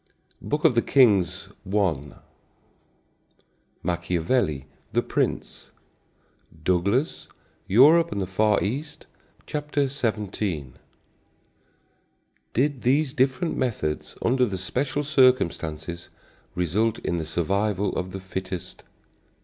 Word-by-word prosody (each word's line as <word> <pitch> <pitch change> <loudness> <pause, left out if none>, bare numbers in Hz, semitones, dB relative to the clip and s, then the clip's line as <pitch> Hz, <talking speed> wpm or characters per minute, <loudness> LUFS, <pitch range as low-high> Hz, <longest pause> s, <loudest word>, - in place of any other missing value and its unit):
I 140 -5 +2
Kings 95 -9 +3
1; 95 -8 -1 1.7
Machiavelli, 85 - 0 0.3
The - - +2
Prince; - - -2 0.9
Douglas, 100 - 0 0.4
Europe 150 - +6
and 100 - -2
the 95 - -1
Far 105 +3 +2
East, 140 +9 -4 0.4
Ch. - - -3 0.3
17. 105 - -2 1.8
Did 135 +1 +1
these 135 +2 +2
different 135 +5 +1
methods 105 -12 -2
under 125 +1 +3
the 95 -3 -3
special 130 +9 -2
circumstances 85 - +1 0.5
result 105 +6 +1
in 85 - -2
the 80 - -2
survival 100 +5 0
of 90 +1 -3
the 95 - -5
fittest? 95 -1 -6
100 Hz, 90 wpm, -25 LUFS, 90-130 Hz, 1.8 s, Europe